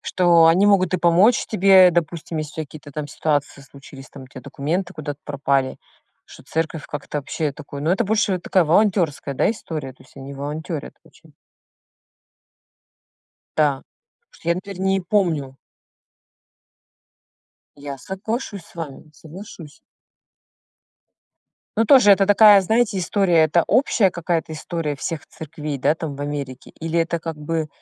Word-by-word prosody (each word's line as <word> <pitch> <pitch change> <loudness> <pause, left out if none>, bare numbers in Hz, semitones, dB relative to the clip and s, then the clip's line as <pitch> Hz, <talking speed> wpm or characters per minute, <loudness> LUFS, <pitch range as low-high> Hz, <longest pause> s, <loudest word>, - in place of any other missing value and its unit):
что 170 -2 +4
они 180 +5 +4
могут 185 -3 +3
и - - +1
помочь 175 +7 +3
тебе, 190 -3 +6
допустим, 170 -1 -3
если 155 0 -5
у - - -3
тя - - -19
какие-то 145 0 -13
там 150 +1 -4
ситуации 145 -1 -2
случились, 135 0 -14
там 135 -2 -12
у - - -14
тя 130 - -11
документы 175 +9 -3
куда-то 145 -2 -6
пропали. 140 -2 -1 0.5
Что - - -15
церковь 160 -1 -3
как-то 145 0 -5
вообще 150 +1 -3
такое 140 -1 -9
Но 160 +4 +1
это 200 +5 +1
больше 205 -2 +1
такая 180 0 +1
волонтерская, 165 -5 +1
да, - - +2
история, 155 - -6
то 130 - -21
есть 130 - -24
они 135 +1 -9
волонтерят 150 +2 -6
очень. - - -22 2.2
Да. 150 -3 +3 0.4
Потому 475 - -52
что 165 - -9
я, - - +3
например, 190 +1 -8
не 190 0 +1
помню 165 -8 -1 2.2
Я 140 -1 -7
соглашусь 200 - -5
с - - -21
вами, 155 -2 -8
соглашусь. 160 -1 -12 2.0
Но 225 - +4
тоже 250 -4 +6
это 195 0 +5
такая, 205 -1 +7
знаете, 220 +2 +1
история. 180 -2 +2
Это 160 +2 +2
общая 230 -7 +3
какая-то 170 -2 -2
история 155 -2 -4
всех 155 +2 -5
церквей, 155 -2 -7
да, 140 - +2
там, 160 -4 -6
в - - -9
Америке? 145 -3 -6
Или 165 +1 -1
это 170 +1 -1
как 165 -1 -6
бы 155 +1 -3
165 Hz, 150 wpm, -21 LUFS, 145-190 Hz, 2.2 s, такая